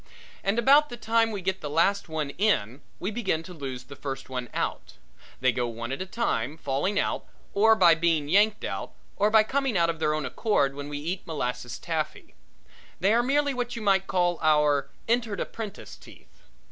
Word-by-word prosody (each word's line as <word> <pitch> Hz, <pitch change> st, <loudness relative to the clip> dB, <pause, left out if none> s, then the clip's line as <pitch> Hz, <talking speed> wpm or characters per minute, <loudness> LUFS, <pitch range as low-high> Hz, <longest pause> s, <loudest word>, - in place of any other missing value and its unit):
And 195 Hz, +3 st, +1 dB
about 280 Hz, +5 st, +5 dB
the 240 Hz, -, -7 dB
time 225 Hz, 0 st, +2 dB
we 205 Hz, -3 st, -4 dB
get 190 Hz, +1 st, -2 dB
the 150 Hz, -, -4 dB
last 170 Hz, +6 st, +1 dB
one 155 Hz, -3 st, -2 dB
in 140 Hz, -, 0 dB, 0.2 s
we 190 Hz, +4 st, -2 dB
begin 195 Hz, -8 st, -1 dB
to 180 Hz, -, -10 dB
lose 135 Hz, -6 st, -6 dB
the 140 Hz, -, -11 dB
first 135 Hz, -1 st, -6 dB
one 125 Hz, -2 st, -4 dB
out. -, -, -3 dB, 0.5 s
They 130 Hz, -1 st, +4 dB
go 120 Hz, -1 st, -1 dB
one 115 Hz, +1 st, -5 dB
at 135 Hz, -, -3 dB
a 190 Hz, -, -4 dB
time, 155 Hz, -, -1 dB
by 165 Hz, -, -25 dB
falling 185 Hz, +10 st, 0 dB
out, -, -, -1 dB, 0.3 s
or 220 Hz, +2 st, +5 dB
by 175 Hz, -5 st, +6 dB
being 165 Hz, -3 st, +1 dB
yanked 205 Hz, +6 st, +3 dB
out, -, -, -4 dB, 0.2 s
or 205 Hz, +1 st, +2 dB
by 220 Hz, 0 st, +6 dB
coming 265 Hz, -2 st, 0 dB
out 170 Hz, -1 st, +3 dB
of 165 Hz, -, -10 dB
their 155 Hz, -1 st, +1 dB
own 155 Hz, -, -2 dB
accord 145 Hz, -12 st, +1 dB
when 145 Hz, +1 st, -7 dB
we 145 Hz, -, -4 dB
eat 170 Hz, +6 st, -4 dB
molasses 125 Hz, -6 st, -3 dB
taffy. -, -, -4 dB, 0.7 s
They 195 Hz, +5 st, +3 dB
were 235 Hz, -, +4 dB
merely 285 Hz, +3 st, +1 dB
what 245 Hz, -1 st, -3 dB
you 230 Hz, -, -5 dB
might 195 Hz, -1 st, +3 dB
call 175 Hz, -2 st, +1 dB
our 150 Hz, -3 st, +3 dB, 0.2 s
Entered 230 Hz, -3 st, 0 dB
Apprentice 215 Hz, -4 st, -6 dB
teeth. -, -, -18 dB
180 Hz, 200 wpm, -27 LUFS, 145-220 Hz, 0.7 s, by